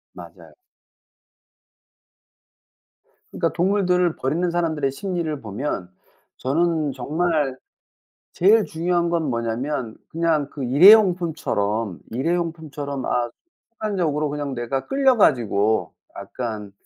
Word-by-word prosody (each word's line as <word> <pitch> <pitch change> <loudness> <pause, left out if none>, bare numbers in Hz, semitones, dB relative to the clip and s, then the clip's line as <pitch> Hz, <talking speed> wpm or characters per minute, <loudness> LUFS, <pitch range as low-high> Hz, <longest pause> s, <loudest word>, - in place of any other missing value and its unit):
맞아요. - - -13 2.8
그러니까 - - -1
동물들을 180 -2 +1
버리는 165 +7 -1
사람들의 160 -5 0
심리를 165 -2 -3
보면 105 -3 -4 0.5
저는 155 +2 0
정말 150 0 -1 0.7
제일 210 +4 +4
중요한 170 +1 0
건 165 -4 0
뭐냐면 115 +1 -3
그냥 160 -3 0
그 140 - -7
일회용품처럼, 155 - +4
일회용품처럼 150 -1 -3
아 120 -1 0 0.4
순간적으로 175 -10 -1
그냥 145 -1 -4
내가 130 +2 -3
끌려 270 -2 +3
가지고 110 - +2 0.2
약간 110 -5 -6
150 Hz, 240 characters per minute, -22 LUFS, 130-175 Hz, 2.8 s, 제일